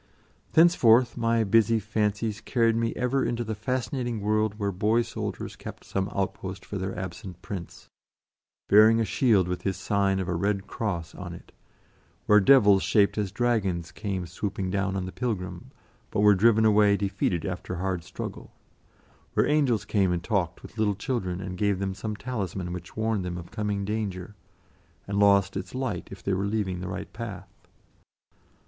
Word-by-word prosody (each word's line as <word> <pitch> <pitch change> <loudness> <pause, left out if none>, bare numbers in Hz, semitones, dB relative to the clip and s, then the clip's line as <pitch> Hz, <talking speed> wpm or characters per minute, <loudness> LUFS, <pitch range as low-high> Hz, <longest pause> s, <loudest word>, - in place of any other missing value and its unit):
Thenceforth 130 -8 +5
my 115 0 +2
busy 115 +2 +3
fancies 105 +1 -1
carried 115 -2 +2
me 115 0 0
ever 130 +2 0
into 120 0 -1
the 110 -1 -3
fascinating 120 +1 -2
world 105 0 0
where 100 -2 -1
boy 110 +5 +2
soldiers - - -5
kept - - -9
some 95 +1 -2
outpost 95 -1 -4
for 100 - -5
their 95 +1 -4
absent 90 -1 -7
Prince, 90 -4 -7 0.8
bearing 110 +2 +6
a 115 - +2
shield 105 -7 +3
with 90 0 -3
his 95 -2 -2
sign 95 +1 +1
of 95 - -2
a 90 - -1
red 100 +3 -1
cross 90 -8 -4
on - - -7
it; - - -14 0.7
where 105 0 +6
devils 100 -4 +6
shaped 100 -2 +3
as 105 -3 -2
dragons 100 -9 0
came 95 -4 -4
swooping 95 +2 -4
down 100 0 -1
on 95 -1 -2
the 95 - -6
pilgrim, 105 -6 -4 0.4
but - - -1
were 105 0 +7
driven 110 +3 +4
away 105 -1 +5
defeated 95 -4 -1
after 90 -1 -4
hard 90 -1 -2
struggle; - - -7 0.8
where - - +4
angels 135 -9 +2
came 100 -3 +2
and 85 -1 -1
talked 90 -5 -1
with 115 - -11
little 105 -2 +2
children, 95 -6 -3
and 95 -1 -6
gave 100 -2 +2
them 95 0 -2
some 105 +2 -5
talisman 100 -6 -4
which 85 +2 -9
warned 110 -3 0
them 90 -1 -4
of 85 -1 -9
coming 105 -3 -2
danger, 105 -2 -3 0.7
and 100 0 -1
lost 100 -1 +4
its 95 +5 -5
light 130 -9 -3
if 95 -2 -11
they 100 - 0
were 95 +2 0
leaving 100 -4 -1
the 90 - -5
right 95 - -6
path. 100 -5 -7
100 Hz, 170 wpm, -27 LUFS, 95-110 Hz, 0.8 s, were